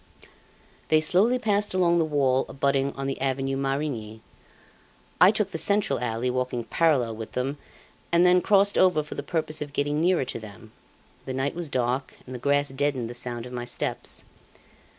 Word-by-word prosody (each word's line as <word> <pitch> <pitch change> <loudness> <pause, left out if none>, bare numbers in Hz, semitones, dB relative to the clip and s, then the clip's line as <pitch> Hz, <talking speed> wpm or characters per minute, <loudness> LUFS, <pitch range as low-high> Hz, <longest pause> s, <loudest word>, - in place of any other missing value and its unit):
They 155 - +4
slowly 190 +10 +3
passed 210 -5 0
along 170 -2 +3
the 165 - +2
wall 135 -4 +1
abutting 140 0 0
on 135 - -5
the 135 -1 -3
Avenue 135 0 -1
Marigny. 135 -6 -3 1.0
I 180 - +9
took 210 -1 0
the 165 - -2
central 200 - +2
alley, 115 0 -2
walking 125 -1 -2
parallel 130 -7 +1
with 110 0 -8
them, 135 +3 -2 0.5
and 170 +1 +4
then 180 0 +5
crossed 200 +1 +3
over 180 -5 +4
for 150 - -8
the - - -4
purpose 155 -2 -2
of 145 -1 -6
getting 145 +1 0
nearer 175 -5 +2
to 125 - -5
them. 110 0 -12 0.6
The 130 - -3
night 135 +2 -1
was 170 -2 -4
dark, 125 +1 -1
and 130 - -9
the 125 - -6
grass 145 +2 +1
deadened 135 -3 -2
the - - -7
sound 120 -1 -5
of 125 - -9
my 120 -1 -4
steps. 120 - -3
140 Hz, 180 wpm, -26 LUFS, 125-165 Hz, 1.0 s, I